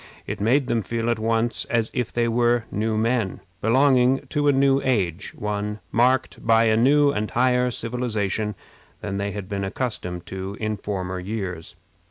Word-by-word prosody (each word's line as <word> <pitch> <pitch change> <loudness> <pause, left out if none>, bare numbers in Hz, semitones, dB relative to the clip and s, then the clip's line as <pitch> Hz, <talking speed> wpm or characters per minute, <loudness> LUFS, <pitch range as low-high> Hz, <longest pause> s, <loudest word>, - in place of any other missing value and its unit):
It - - -5
made 130 +6 +3
them 115 -2 0
feel 115 +2 -1
at 115 - -1
once 115 +1 0
as 115 -1 0
if 125 -3 -2
they 120 -1 +1
were 120 0 +2
new 110 +1 -1
men, 115 -3 0 0.2
belonging 130 +2 +3
to 145 0 0
a - - +6
new 135 0 +3
age 100 -8 0
one 105 0 -3
marked 130 +3 +1
by 115 0 +4
a 110 -1 +3
new 140 +5 +4
and 105 -4 -2
higher 125 0 +2
civilization 110 -4 -2 0.5
than 100 -2 -3
they 100 0 -1
had 100 -2 -6
been 100 0 -3
accustomed 95 -5 -4
to 95 +2 -6
in 110 -1 -1
former 95 -2 -4
years. 90 -4 -5
115 Hz, 170 wpm, -23 LUFS, 100-125 Hz, 0.5 s, a